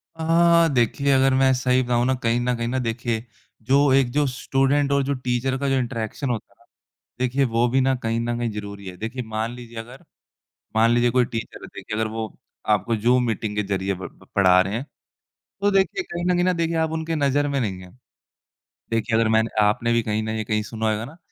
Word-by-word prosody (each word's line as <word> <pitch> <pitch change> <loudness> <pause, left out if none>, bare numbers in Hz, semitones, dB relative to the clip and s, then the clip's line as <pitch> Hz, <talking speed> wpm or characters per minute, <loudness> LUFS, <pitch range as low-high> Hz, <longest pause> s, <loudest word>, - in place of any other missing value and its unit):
अ, 170 +1 +4
देखिए 135 +3 +1
अगर 135 0 +4
मैं 130 0 +4
सही 130 0 +2
बताऊँ 120 0 +1
ना, 130 - +2
कहीं 120 -1 0
न 125 0 0
कहीं 115 0 -2
ना 130 +2 -1
देखिए 115 -1 -2 0.4
जो 140 +1 +4
एक 135 -2 +3
जो 145 +2 +2
स्टूडेंट 135 +2 +1
और 140 0 +2
जो 140 +1 -1
टीचर 130 0 -1
का 140 +1 -1
जो 135 - +2
इंटरैक्शन 120 +1 -3
होता 120 -3 -4
ना, - - -25 0.5
देखिए 130 +2 +1
वो 120 0 +1
भी 135 +2 +2
ना 135 0 +2
कहीं 115 0 -1
न 120 0 -2
कहीं 120 -1 -1
ज़रूरी 100 -2 -7
है, 90 - -7
देखिए 115 +6 -5
मान 110 +1 -3
लीजिए 120 -1 -11
अगर 120 +4 -10 0.7
मान 115 +1 +5
लीजिए 120 0 +3
कोई 125 +1 +3
टीचर 115 -1 -6
थे - - -10
कि - - -6
अगर 110 0 0
वो 110 -1 -4 0.4
आपको 115 +4 -2
जूम 120 +3 +2
मीटिंग 110 -2 -3
के 105 - +1
ज़रिए 95 +1 -1
ब 95 0 -7
ब - - -21
पढ़ा 90 -2 +6
रहे 95 +3 -1
हैं, 120 - -3 0.8
तो 205 - +3
देखिए 195 - +1
कहीं 175 - -5
न 180 - +3
कहीं 175 - +2
ना 185 - +2
देखिए 165 -1 -1
आप 160 0 0
उनके 160 0 -2
नज़र 145 -1 +1
में 140 -1 -1
नहीं 100 -7 -2
हैं, 90 - -13 1.0
देखिए 115 +1 0
अगर 115 - +3
मैंने 110 -1 +2
आपने 115 +3 +1
भी 115 - +3
कहीं 110 -1 -1
न 110 0 -2
कहीं 110 -1 +1
सुना 110 +1 -2
होगा 110 +2 -2
ना 155 +6 -12
120 Hz, 220 wpm, -23 LUFS, 110-135 Hz, 1.0 s, पढ़ा